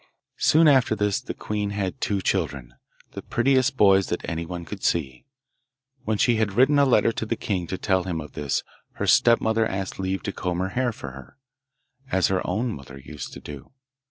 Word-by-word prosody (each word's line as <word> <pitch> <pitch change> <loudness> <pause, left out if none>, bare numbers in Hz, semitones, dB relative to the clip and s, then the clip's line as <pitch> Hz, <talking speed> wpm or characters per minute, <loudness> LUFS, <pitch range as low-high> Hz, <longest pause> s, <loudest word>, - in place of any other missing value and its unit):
Soon 160 +1 +5
after 130 -6 +4
this 105 -1 0
the - - -6
queen 105 -1 -3
had 100 -2 -3
two 100 -2 0
children, 70 -12 -2 0.4
the - - -7
prettiest 130 +2 +1
boys 95 -3 +5
that 90 - -4
anyone 85 +1 -4
could 100 +1 -8
see. 65 -7 -1 0.8
When 110 -1 0
she 120 +2 +3
had 110 -3 0
written 135 +6 +4
a 140 - +5
letter 120 -3 +3
to 115 - -4
the 110 +1 -2
king 95 -6 -3
to 95 - -4
tell 95 -2 0
him 85 -3 -2
of 75 -1 -8
this 70 -2 -2 0.3
her - - -3
stepmother 115 -1 +4
asked 95 0 -4
leave 95 0 -2
to 100 - -3
comb 90 -2 -3
her 95 +1 -1
hair 125 +5 0
for 70 -10 -8
her, 65 - -13 0.7
as 95 -1 +2
her 95 -1 +1
own 115 +1 -1
mother 70 -4 -10
used 75 +2 -8
to - - -8
do. 70 - -10
95 Hz, 195 wpm, -24 LUFS, 85-115 Hz, 0.8 s, Soon